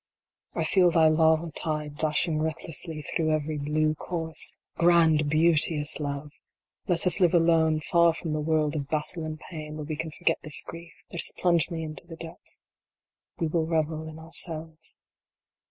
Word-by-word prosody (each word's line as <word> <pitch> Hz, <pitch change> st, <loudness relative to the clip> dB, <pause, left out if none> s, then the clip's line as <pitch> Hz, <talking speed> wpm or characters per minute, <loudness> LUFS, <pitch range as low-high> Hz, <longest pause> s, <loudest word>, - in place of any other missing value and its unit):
I -, -, 0 dB
feel 185 Hz, -2 st, +4 dB
thy 165 Hz, -2 st, +5 dB
lava 160 Hz, +1 st, +3 dB
tide 150 Hz, -2 st, -3 dB
dashing 155 Hz, +1 st, +1 dB
recklessly 160 Hz, 0 st, -2 dB
through 155 Hz, +2 st, -1 dB
every 155 Hz, -1 st, -1 dB
blue 155 Hz, +2 st, +1 dB
course! 160 Hz, 0 st, -4 dB, 0.2 s
Grand, 165 Hz, -3 st, +4 dB
beauteous 155 Hz, -1 st, +3 dB
Love! 145 Hz, 0 st, -4 dB, 0.6 s
Let 175 Hz, -2 st, +2 dB
us 180 Hz, +1 st, +3 dB
live 180 Hz, -2 st, +4 dB
alone, 165 Hz, -2 st, +3 dB
far 170 Hz, +2 st, +4 dB
from 165 Hz, -1 st, -4 dB
the 155 Hz, -, -1 dB
world 155 Hz, -1 st, +1 dB
of 140 Hz, -3 st, -3 dB
battle 155 Hz, +3 st, -1 dB
and 155 Hz, 0 st, -5 dB
pain, 155 Hz, -3 st, -8 dB
where 155 Hz, -1 st, -5 dB
we 155 Hz, +1 st, -3 dB
can 160 Hz, +1 st, -4 dB
forget 155 Hz, -, 0 dB
this 155 Hz, -2 st, -2 dB
grief 170 Hz, +1 st, -11 dB
that 170 Hz, -, -3 dB
has -, -, -8 dB
plunged 170 Hz, -3 st, +2 dB
me 165 Hz, -2 st, -4 dB
into 155 Hz, +2 st, -7 dB
the 165 Hz, -, -8 dB
depths. 165 Hz, 0 st, -10 dB, 0.7 s
We 165 Hz, -, -1 dB
will 160 Hz, 0 st, 0 dB
revel 160 Hz, -1 st, -1 dB
in 155 Hz, -, -10 dB
ourselves. 160 Hz, 0 st, -7 dB
160 Hz, 170 wpm, -27 LUFS, 155-165 Hz, 0.7 s, thy